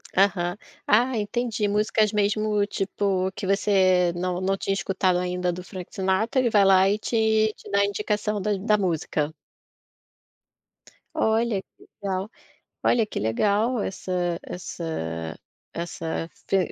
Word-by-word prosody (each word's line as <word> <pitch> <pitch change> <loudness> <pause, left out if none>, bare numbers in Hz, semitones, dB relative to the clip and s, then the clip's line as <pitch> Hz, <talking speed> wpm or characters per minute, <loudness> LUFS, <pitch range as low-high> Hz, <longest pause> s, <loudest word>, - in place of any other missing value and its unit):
Aham. 185 -2 +2 0.3
Ah 240 +3 +3
entendi, 215 0 -1
músicas 210 +1 +2
mesmo 210 0 +1
tipo 195 -1 -1
que 200 - -5
você 185 -3 +3
não 180 0 -2
não 195 +1 +1
tinha 195 0 -1
escutado 185 -1 +1
ainda 180 0 -1
do 180 +1 -6
Frank 185 -1 -9
Sinatra, 190 +6 +1
ele 250 -2 +3
vai 210 -3 +5
lá 190 0 +6
e 205 - +2
te 220 -1 +2
te - - -13
dá 200 - +3
a 200 - +4
indicação 210 +1 -1
da 210 +2 0
da 210 +2 +2
música. 160 -5 -1 1.8
Olha 220 -2 +1
que - - -24 0.2
legal, 195 +1 -2 0.5
olha 230 -2 +3
que - - -5
legal 205 - +1
essa 180 -3 -2
essa 80 - -5 0.4
essa 165 -1 -4 0.2
f 195 - +4
195 Hz, 135 wpm, -25 LUFS, 180-210 Hz, 1.8 s, lá